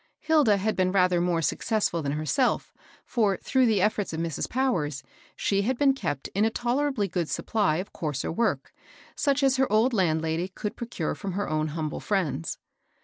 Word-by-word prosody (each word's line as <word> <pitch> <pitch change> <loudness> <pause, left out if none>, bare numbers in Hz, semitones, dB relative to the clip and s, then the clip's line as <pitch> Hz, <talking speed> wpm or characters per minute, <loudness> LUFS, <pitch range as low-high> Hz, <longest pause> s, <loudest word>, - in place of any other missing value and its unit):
Hilda 300 -10 +3
had 215 +3 -1
been 185 -1 +1
rather 180 -2 +3
more 175 -2 +1
successful 205 -2 0
than 140 -1 -2
her 155 +1 -3
«elf; 255 - +1 0.3
for, 210 -5 +1
through 260 -2 +2
the 215 -4 +2
^CH*t8 210 -2 0
of 160 - -3
Mrs. 165 -3 -2
Powers, 165 - 0 0.3
she 200 0 +1
had 240 +5 0
been 275 0 +4
kept 145 - -3
in 200 - 0
a 220 - +4
tolerably 245 -1 0
good 170 -3 -2
supply 200 -8 0
ci 200 - -21
coarser 150 -4 -3
work, 225 +7 -1 0.4
such 280 -1 +1
as 265 -1 +3
their 265 -3 +1
old 225 +4 +3
landlady 160 -3 +1
could 205 +2 -5
procure 235 0 -3
from 195 -4 -5
her 200 +2 -2
own 155 0 0
humble 155 0 -3
friends. 180 - -1
200 Hz, 185 wpm, -27 LUFS, 165-235 Hz, 0.4 s, been